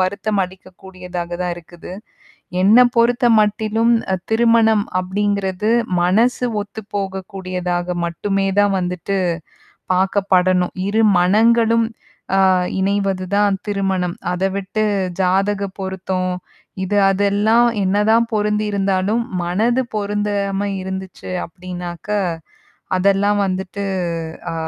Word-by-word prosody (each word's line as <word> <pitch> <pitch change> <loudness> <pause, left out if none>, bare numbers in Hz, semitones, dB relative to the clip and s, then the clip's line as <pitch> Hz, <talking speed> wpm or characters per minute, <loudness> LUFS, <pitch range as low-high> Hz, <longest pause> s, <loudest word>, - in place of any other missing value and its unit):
வருத்தம் 200 +2 0
அளிக்கக்கூடியதாக 180 -1 -9
தான் 180 -1 -1
இருக்குது. 175 0 -12 0.7
என்ன 205 +5 +6 0.2
பொறுத்த 240 +2 +3
மட்டிலும், 215 +2 +1 0.4
திருமணம் 225 -2 +4 0.2
அப்பிடிங்கிறது 200 +1 -1 0.3
மனசு 230 +7 +2
ஒத்து 205 +2 -8
போகக்கூடியதாக 185 -2 -3
மட்டுமே 195 +3 -1
தான் 205 0 +4
வந்துட்டு 180 +2 -2 0.8
பார்க்கப்படணும். 185 -1 +2
இரு 220 +2 +2 0.2
மனங்களும் 225 +4 +3 0.5
ஆ - - +4 0.4
இணைவது 195 -1 0
தான் 205 -1 +3
திருமணம் 190 -3 -1 0.2
அத 180 +1 -3
விட்டு 200 +2 -1 0.4
ஜாதக 195 +2 +1 0.2
பொருத்தம், 190 -1 -2 0.5
இது 205 +2 0
அதெல்லாம் 205 +4 +3 0.2
என்னதான் 210 +4 +3
பொருந்தி 210 0 +1
இருந்தாலும் 200 +3 0 0.2
மனது 225 +9 +1
பொருந்தாம 205 -1 -1
இருந்துச்சு 190 0 -7 0.2
அப்பிடினாக்க, 175 +1 -8 0.9
அதெல்லாம் 200 +2 +2
வந்துட்டு, 190 +1 -3 0.7
ஆ, - - -4
195 Hz, 90 wpm, -19 LUFS, 185-210 Hz, 0.9 s, என்ன